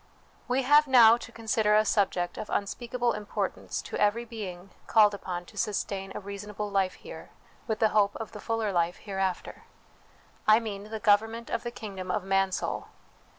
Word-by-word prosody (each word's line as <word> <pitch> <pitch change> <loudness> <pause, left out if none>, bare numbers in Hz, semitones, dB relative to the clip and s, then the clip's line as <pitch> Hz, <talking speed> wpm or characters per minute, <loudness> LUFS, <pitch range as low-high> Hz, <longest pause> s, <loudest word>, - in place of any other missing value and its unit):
We 255 +2 +1
have 295 +3 +5
now 235 -4 +8
to - - -10
con 230 -1 -12
sider 215 -2 +3
a 215 0 +4
subject 190 -4 0
of - - -6
unspeakable 240 +4 -1
importance 210 0 -4
to - - -5
every 215 +3 +2
being 195 -5 -8 0.2
called 210 -2 +5
upon 180 -3 -5
to 210 - -16
sustain 195 -2 -2
a - - -3
reasonable 205 +1 -6
life 195 -2 +1
here, - - -11 0.4
with 220 -2 -1
the 220 -1 +3
hope 205 -1 +2
of 225 - -6
the 210 - -9
fuller 225 -2 -1
life 175 -1 0
hereafter; 190 -3 -4 0.8
I 215 +1 +7
mean, 205 -3 -6
the 220 +1 -6
government 225 +2 +2
of - - -1
the 240 - -4
kingdom 195 -5 -7
of 185 +2 -1
Mansoul. 195 0 0
210 Hz, 175 wpm, -28 LUFS, 195-225 Hz, 0.8 s, now